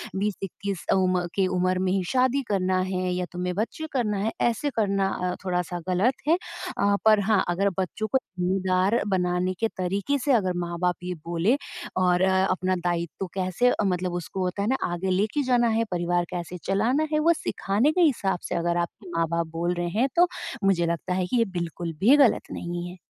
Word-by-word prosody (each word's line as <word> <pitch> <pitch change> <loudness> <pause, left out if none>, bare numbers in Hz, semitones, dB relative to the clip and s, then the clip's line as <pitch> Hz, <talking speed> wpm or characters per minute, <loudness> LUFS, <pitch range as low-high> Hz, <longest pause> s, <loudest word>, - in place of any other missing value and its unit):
20-21 195 -1 -3
अ - - +5
उम, 185 -1 +2 0.2
के 190 -2 +2
उम्र 185 0 +1
में 185 0 +1
ही 190 -1 +1
शादी 260 +1 +2
करना 185 -2 +1
है 185 -1 -1
या 180 0 -1
तुम्हें 180 0 -2
बच्चे 235 - -3
करना 220 -6 0
है 220 +3 0
ऐसे 240 +5 +1
करना 195 -3 +2 0.2
अ, - - -4
थोड़ा-सा 180 -1 -1
गलत 195 +8 +3
है। 330 - +5 0.4
अ, 200 0 +3
पर 215 -1 +6
हाँ, 210 -3 +4
अगर 195 +3 +2
बच्चों 200 +4 -2
को 265 - +2 0.2
ज़िम्मेदार 185 +3 +1
बनाने 180 -1 0
के 225 - +2
तरीके 195 +9 0
से 285 - +3
अगर 185 -6 +2
माँ-बाप 175 +1 -1
ये 180 0 -3
बोले 175 +10 +2 0.5
और 180 0 +3
अ, 190 0 +3
अपना 185 0 0
दायित्व 175 +2 -2
कैसे 185 +6 +2
अ, 215 - 0
मतलब 180 -1 -1
उसको 190 +2 -4
होता 180 +2 -2
है 210 - 0
ना 265 - +2 0.2
आगे 185 +2 -2
लेके 210 +10 +1
जाना 245 -2 +3
है, 225 +1 +2
परिवार 175 0 0
कैसे 175 0 -5
चलाना 240 +11 +2
है 305 - +3
वो 335 +2 +4
सिखाने 215 +10 +1
के 360 - +1
हिसाब 215 - +2
से - - -1
अगर 170 0 0
आपके 175 +3 -4
माँ-बाप 165 0 0
बोल 170 +2 -2
रहे 175 0 -2
हैं, 265 - +4
तो 350 +1 +6 0.4
मुझे 185 -3 +3
लगता 170 +2 -2
है 185 0 0
कि 245 - 0
ये 230 - +4
बिल्कुल 170 0 -4
भी 245 +8 +7
गलत 240 - +4
नहीं 175 0 -4
है। 180 - -10
190 Hz, 200 wpm, -25 LUFS, 180-215 Hz, 0.5 s, भी